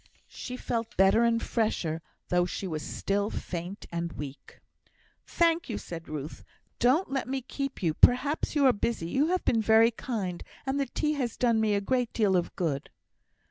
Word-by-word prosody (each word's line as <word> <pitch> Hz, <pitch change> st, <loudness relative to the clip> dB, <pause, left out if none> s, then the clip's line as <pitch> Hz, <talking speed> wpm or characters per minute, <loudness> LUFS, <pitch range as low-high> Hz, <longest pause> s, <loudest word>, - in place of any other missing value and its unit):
She 250 Hz, -1 st, -6 dB
felt 230 Hz, -2 st, -3 dB
better 195 Hz, +4 st, +5 dB
and 230 Hz, -1 st, +2 dB
fresher, 170 Hz, -8 st, -1 dB, 0.3 s
though 180 Hz, 0 st, +2 dB
she 195 Hz, -, -4 dB
was 160 Hz, -4 st, -3 dB
still 200 Hz, +5 st, -1 dB
faint 180 Hz, +1 st, -5 dB
and 170 Hz, 0 st, -3 dB
weak. 145 Hz, -1 st, -9 dB, 0.7 s
"Thank 335 Hz, -2 st, +2 dB
you," 225 Hz, -, -2 dB
said 165 Hz, -1 st, -8 dB
Ruth. 150 Hz, 0 st, -6 dB, 0.4 s
"Don't 265 Hz, +8 st, +3 dB
let 270 Hz, -1 st, -1 dB
me 265 Hz, -1 st, -2 dB
keep 275 Hz, -3 st, -5 dB
you; 165 Hz, -3 st, +2 dB
perhaps 280 Hz, -, +3 dB
you 285 Hz, -2 st, +4 dB
are 260 Hz, -, +6 dB
busy. 205 Hz, -6 st, -2 dB
You 285 Hz, +4 st, +2 dB
have 365 Hz, +1 st, 0 dB
been 225 Hz, -, +3 dB
very 220 Hz, +2 st, +5 dB
kind, 210 Hz, -7 st, -4 dB, 0.2 s
and 270 Hz, +1 st, 0 dB
the 275 Hz, -, 0 dB
tea 300 Hz, +4 st, -1 dB
has 250 Hz, -6 st, -2 dB
done 230 Hz, -3 st, +3 dB
me 215 Hz, -2 st, +2 dB
a 200 Hz, -, +1 dB
great 245 Hz, +3 st, 0 dB
deal 205 Hz, -4 st, +2 dB
of 175 Hz, -1 st, 0 dB
good." 150 Hz, -6 st, -2 dB
225 Hz, 180 wpm, -28 LUFS, 180-260 Hz, 0.7 s, are